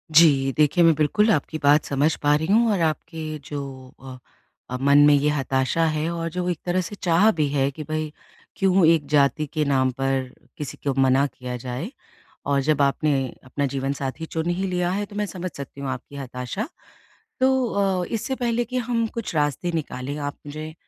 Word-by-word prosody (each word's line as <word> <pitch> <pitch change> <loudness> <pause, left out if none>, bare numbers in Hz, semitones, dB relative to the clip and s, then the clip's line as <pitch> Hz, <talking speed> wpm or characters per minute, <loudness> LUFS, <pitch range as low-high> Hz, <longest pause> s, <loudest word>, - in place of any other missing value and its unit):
जी, 140 -5 +6
देखिए 155 +3 +4
मैं 165 -1 +6
बिल्कुल 210 +9 +3
आपकी 155 -1 0
बात 145 +1 +5
समझ 145 +3 +1
पा 145 0 +4
रही 155 +2 -1
हूँ 230 +2 +4
और 200 - +1
आपके 155 0 -2
जो 135 -3 -7 0.8
अ, 125 - -3
मन 140 +1 +5
में 150 - +6
ये 145 +1 +3
हताशा 135 +2 +1
है 155 +2 -1
और 165 0 -3
जो 180 +1 -3
एक 175 -3 -2
तरह 180 +1 +1
से 180 +4 -6
चाह 180 +4 +3
भी 155 -3 0
है 135 -1 +2
कि 155 +3 -7
भई 155 -1 -2 0.5
क्यों 190 -2 +4
एक 160 -3 +4
जाति 150 +1 +2
के 155 -2 +1
नाम 130 -2 +2
पर 135 -1 -1 0.3
किसी 145 -5 -6
को 140 - +2
मना 135 +1 +4
किया 125 -2 -7
जाए 125 - -5 0.6
और 140 -1 +3
जब 145 0 +2
आपने 140 +2 +2 0.3
अपना 140 +2 -2
जीवनसाथी 135 +2 -3
चुन 160 +1 -3
ही 185 +2 -1
लिया 180 -1 0
है, 205 +2 -1
तो 205 - -12
मैं 210 0 0
समझ 185 -1 -5
सकती 140 0 -8
हूँ 140 - -4
आपकी 130 +2 -7
हताशा। 130 - -5 0.7
तो 260 -1 +3
अ, 195 -4 0
इससे 235 +3 -2
पहले 240 -1 0
कि 255 +2 -5
हम 235 -1 0
कुछ 230 -7 -4
रास्ते 150 +3 0
निकालें 140 -3 -4
आप 145 -1 -4
मुझे 155 +2 -7
155 Hz, 195 wpm, -23 LUFS, 140-180 Hz, 0.8 s, जी